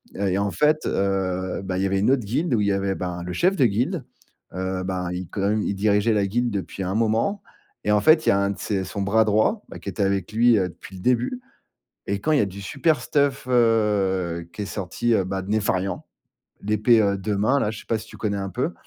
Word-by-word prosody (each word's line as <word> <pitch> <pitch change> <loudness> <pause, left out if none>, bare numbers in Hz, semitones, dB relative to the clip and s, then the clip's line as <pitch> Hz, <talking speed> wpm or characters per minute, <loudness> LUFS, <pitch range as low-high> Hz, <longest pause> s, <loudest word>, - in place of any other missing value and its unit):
et 95 -1 0
en 100 0 0
fait, 150 - +2
heu, 95 -2 -1
bah, 95 -1 -3
il 95 - 0
y - - +2
avait 95 0 +1
une 105 - +2
autre 135 -4 +2
guilde 135 - -1
où 105 - +1
il 100 - +1
y - - +2
avait, 95 0 0
ben, 90 -1 -4
le 90 0 -5
chef 185 - +2
de 135 -7 +3
guilde, 115 +3 0 0.5
heu, 95 0 -3
ben, 90 -1 -3
il 90 -1 -4
quand 100 - -4
même 105 +2 +1
il 100 - -2
dirigeait 105 +2 +2
la 100 -1 +2
guilde 120 +5 0
depuis 100 0 -4
un 95 +3 -2
moment 115 - +1 0.4
et 105 - +1
en 105 - +4
fait, 155 +4 +5
il - - +4
y - - +7
a 100 - +3
un 100 0 +1
de - - -6
ses 95 -3 -1
son 100 +2 -5
bras 110 +3 +3
droit, 110 - +2
bah, - - -9
qui - - -6
était 100 +2 -2
avec 95 -1 -1
lui, 115 0 +4
heu, 90 -2 0
depuis 95 +3 -13
le 90 - -9
début 125 - 0 0.7
et 100 0 -1
quand 155 - 0
il 150 - +4
y - - +5
a - - +2
du 95 +1 -9
super 155 - +1
stuff, 140 -2 0
heu, 100 -8 +1
qui 105 - -4
est - - -5
sorti, 105 +4 -2
bah, 95 +1 -3
de 100 - -9
Nefarian, 95 -3 -1 0.6
l'épée 110 +2 +3 0.2
2 100 +2 -2
mains, 130 +7 +2
là, 105 - 0
je 110 - -8
sais - - -14
pas 115 - 0
si 110 +1 -10
tu - - -12
connais 100 -2 -2
un 95 0 -3
peu 130 - -2
100 Hz, 255 wpm, -23 LUFS, 95-115 Hz, 0.7 s, y